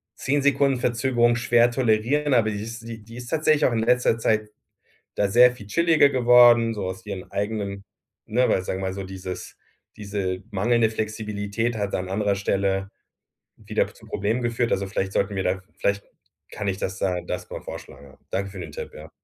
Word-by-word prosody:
10 145 Hz, +2 st, 0 dB
Sekunden 140 Hz, -2 st, +3 dB
Verzögerung 120 Hz, 0 st, +2 dB
schwer 120 Hz, 0 st, +3 dB
tolerieren, 130 Hz, +5 st, +1 dB
aber 110 Hz, -2 st, +3 dB
die 105 Hz, -, -4 dB
ist 115 Hz, +1 st, -7 dB
die 110 Hz, -2 st, -8 dB
die 115 Hz, +2 st, -13 dB
ist 125 Hz, -, -8 dB
tatsächlich 155 Hz, +1 st, +2 dB
auch -, -, +3 dB
in 115 Hz, -, +1 dB
letzter 120 Hz, 0 st, +2 dB
Zeit 110 Hz, -1 st, +1 dB, 0.7 s
da 100 Hz, -, +2 dB
sehr 125 Hz, +5 st, +6 dB
viel 105 Hz, -5 st, -12 dB
chilliger 160 Hz, +1 st, +4 dB
geworden, 120 Hz, -2 st, +6 dB
so 105 Hz, -, -4 dB
aus 95 Hz, +4 st, -6 dB
ihren 95 Hz, -3 st, -6 dB
eigenen 100 Hz, -1 st, -3 dB, 0.4 s
ne, 125 Hz, +4 st, +2 dB
weil -, -, +3 dB
ich 90 Hz, -, -7 dB
sage 95 Hz, -, -3 dB
mal 95 Hz, -1 st, -2 dB
so, 100 Hz, 0 st, -5 dB
dieses 95 Hz, -1 st, -7 dB, 0.4 s
diese 100 Hz, -2 st, -3 dB
mangelnde 110 Hz, +3 st, +2 dB
Flexibilität 110 Hz, +1 st, -3 dB
hat 100 Hz, -1 st, -2 dB
an 95 Hz, 0 st, -3 dB
anderer 100 Hz, 0 st, 0 dB
Stelle 95 Hz, 0 st, 0 dB, 0.7 s
wieder -, -, -1 dB
zu -, -, -17 dB
Problemen 110 Hz, +5 st, -1 dB
geführt. 120 Hz, 0 st, 0 dB
Also 100 Hz, -, +1 dB
vielleicht 95 Hz, 0 st, -2 dB
sollten 100 Hz, -, 0 dB
wir 95 Hz, -, -1 dB
da 90 Hz, -, +1 dB
v -, -, -20 dB, 0.2 s
vielleicht 100 Hz, 0 st, 0 dB, 0.5 s
kann 105 Hz, -, -5 dB
ich 95 Hz, -1 st, -1 dB
das 95 Hz, -1 st, -3 dB
da 90 Hz, -2 st, -1 dB
das 90 Hz, 0 st, -5 dB
mal -, -, -6 dB
vorschlagen, 70 Hz, -, -10 dB
ja. 65 Hz, -, -18 dB
Danke 100 Hz, 0 st, -2 dB
für 95 Hz, -, -9 dB
den 80 Hz, -4 st, -7 dB
Tipp, -, -, -7 dB
ja. 75 Hz, +1 st, -10 dB
110 Hz, 195 wpm, -24 LUFS, 100-120 Hz, 0.7 s, sehr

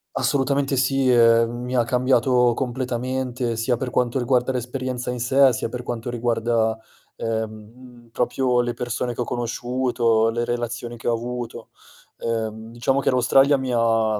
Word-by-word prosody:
Assolutamente, 140 Hz, 0 st, +1 dB
sì, 135 Hz, 0 st, +2 dB
ehm, 115 Hz, -1 st, +5 dB
mi 125 Hz, +1 st, -5 dB
ha 120 Hz, -2 st, +2 dB
cambiato 125 Hz, 0 st, +3 dB
completamente, 125 Hz, -1 st, -2 dB
sia 115 Hz, +2 st, 0 dB
per 125 Hz, -1 st, -4 dB
quanto 125 Hz, +2 st, 0 dB
riguarda 125 Hz, +1 st, +1 dB
l'esperienza 125 Hz, 0 st, -4 dB
in 125 Hz, -1 st, -3 dB
sé, 130 Hz, +1 st, +4 dB
sia 115 Hz, -, -3 dB
per 125 Hz, +1 st, -6 dB
quanto 120 Hz, 0 st, -4 dB
riguarda, 115 Hz, -1 st, 0 dB, 0.4 s
ehm, 110 Hz, -1 st, -2 dB
mhmm, 120 Hz, +2 st, -15 dB
proprio 125 Hz, +1 st, +1 dB
le 120 Hz, 0 st, 0 dB
persone 120 Hz, 0 st, -3 dB
che -, -, -3 dB
ho -, -, +2 dB
conosciuto, 120 Hz, -1 st, 0 dB
le 120 Hz, +1 st, -1 dB
relazioni 120 Hz, 0 st, -4 dB
che -, -, -7 dB
ho 120 Hz, -, +3 dB
avuto, 120 Hz, 0 st, -5 dB, 0.5 s
ehm, 110 Hz, -1 st, -4 dB
diciamo 135 Hz, +3 st, 0 dB
che -, -, +1 dB
l'Australia 135 Hz, +3 st, +4 dB
mi 130 Hz, -1 st, -2 dB
ha 115 Hz, -2 st, +2 dB
120 Hz, 155 wpm, -23 LUFS, 115-130 Hz, 0.5 s, ehm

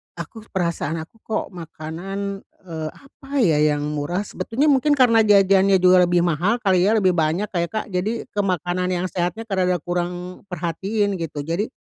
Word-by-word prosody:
aku 225 Hz, -1 st, -9 dB
perasaan 170 Hz, -4 st, -2 dB
aku 225 Hz, +8 st, -20 dB
kok 220 Hz, -, -2 dB
makanan, 180 Hz, +4 st, -6 dB, 0.3 s
eee, 160 Hz, -3 st, -5 dB
apa 275 Hz, 0 st, -18 dB
ya, 160 Hz, -7 st, +3 dB, 0.2 s
yang 145 Hz, -, -3 dB
murah, 150 Hz, +6 st, -2 dB
sebetulnya 270 Hz, +8 st, 0 dB
mungkin 290 Hz, +2 st, +3 dB
karena 245 Hz, -4 st, +5 dB
jajannya 195 Hz, -1 st, +5 dB
juga 180 Hz, -1 st, +5 dB
lebih 175 Hz, 0 st, +2 dB
mahal 175 Hz, +5 st, +1 dB
kali 190 Hz, -2 st, +3 dB
ya, 220 Hz, -, +3 dB
lebih 190 Hz, -4 st, +3 dB
banyak 170 Hz, +4 st, 0 dB
kayak, 170 Hz, -2 st, 0 dB
Kak, 215 Hz, -1 st, -2 dB
jadi 205 Hz, +6 st, -1 dB
ke 210 Hz, -, -4 dB
makanan 180 Hz, -1 st, 0 dB
yang 175 Hz, +1 st, -1 dB
sehatnya 175 Hz, +5 st, -2 dB
rada 185 Hz, -1 st, +2 dB
kurang 175 Hz, +1 st, -4 dB
perhatiin 190 Hz, +3 st, -2 dB
gitu. 150 Hz, -3 st, -4 dB
Jadi, 170 Hz, +8 st, -1 dB
185 Hz, 170 wpm, -22 LUFS, 170-205 Hz, 0.3 s, karena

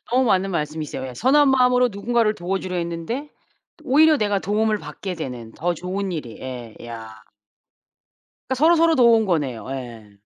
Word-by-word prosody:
너무 255 Hz, +1 st, +3 dB
맞는 195 Hz, -2 st, +2 dB
말씀이세요. 150 Hz, -5 st, -3 dB
예. 125 Hz, -, -9 dB
선한 275 Hz, -, +4 dB
마음으로 250 Hz, -1 st, +4 dB
누군가를 215 Hz, +2 st, +1 dB
도와 185 Hz, +3 st, -2 dB
주려 185 Hz, -1 st, -5 dB
했는데 170 Hz, -, -4 dB, 0.6 s
오히려 305 Hz, +3 st, +5 dB
내가 205 Hz, -4 st, 0 dB
도움을 215 Hz, +2 st, 0 dB
받게 190 Hz, -2 st, -6 dB
되는 125 Hz, -8 st, -7 dB
더 175 Hz, +6 st, -1 dB
좋은 185 Hz, +3 st, -4 dB
일이. 130 Hz, -9 st, -6 dB
예 125 Hz, -4 st, -7 dB
야. 110 Hz, -2 st, -9 dB, 1.3 s
그러니까 260 Hz, -, 0 dB
서로 325 Hz, +5 st, +5 dB
서로 330 Hz, 0 st, +4 dB
도운 235 Hz, -4 st, +5 dB
거네요. 145 Hz, -, -1 dB
예. 115 Hz, -6 st, -8 dB
190 Hz, 350 characters per minute, -22 LUFS, -, 1.3 s, 오히려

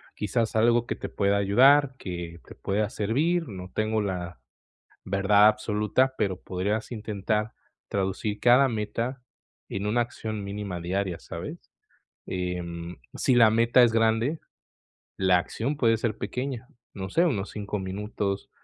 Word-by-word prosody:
quizás, 110 Hz, +3 st, -1 dB
algo 120 Hz, +2 st, +3 dB
que -, -, -2 dB
te -, -, -6 dB
pueda 100 Hz, 0 st, +1 dB
ayudar, 130 Hz, +8 st, +5 dB
que 85 Hz, -2 st, -6 dB
te -, -, -11 dB
pueda 105 Hz, +2 st, -1 dB
servir, 155 Hz, -, 0 dB
no 95 Hz, -3 st, -8 dB
tengo 110 Hz, +1 st, 0 dB
la 90 Hz, -7 st, -4 dB, 0.6 s
verdad 100 Hz, +2 st, +4 dB
absoluta, 105 Hz, +4 st, +1 dB
pero 95 Hz, -3 st, -1 dB
podrías 100 Hz, +6 st, -2 dB
intentar 105 Hz, 0 st, -2 dB, 0.4 s
traducir 100 Hz, +2 st, -2 dB
cada 125 Hz, +3 st, +5 dB
meta 115 Hz, +4 st, -3 dB, 0.5 s
en 100 Hz, +1 st, -3 dB
una 120 Hz, +3 st, +2 dB
acción 110 Hz, -3 st, -4 dB
mínima 100 Hz, -2 st, -5 dB
diaria, 90 Hz, 0 st, -2 dB
¿sabes?, -, -, -8 dB, 0.6 s
em, 90 Hz, -1 st, -4 dB, 0.2 s
si 130 Hz, -, +2 dB
la 115 Hz, -2 st, +7 dB
meta 115 Hz, +3 st, +5 dB
es 120 Hz, -, +5 dB
grande, 115 Hz, +7 st, +2 dB, 0.8 s
la 95 Hz, -1 st, +4 dB
acción 120 Hz, +10 st, -3 dB
puede 115 Hz, -4 st, +4 dB
ser 110 Hz, -1 st, -2 dB
pequeña, 125 Hz, +3 st, -4 dB, 0.2 s
no 95 Hz, -2 st, -5 dB
sé, 165 Hz, -, +3 dB
unos 110 Hz, -, -1 dB
5 105 Hz, 0 st, -4 dB
minutos, 100 Hz, +1 st, -3 dB
105 Hz, 140 wpm, -26 LUFS, 95-115 Hz, 0.8 s, la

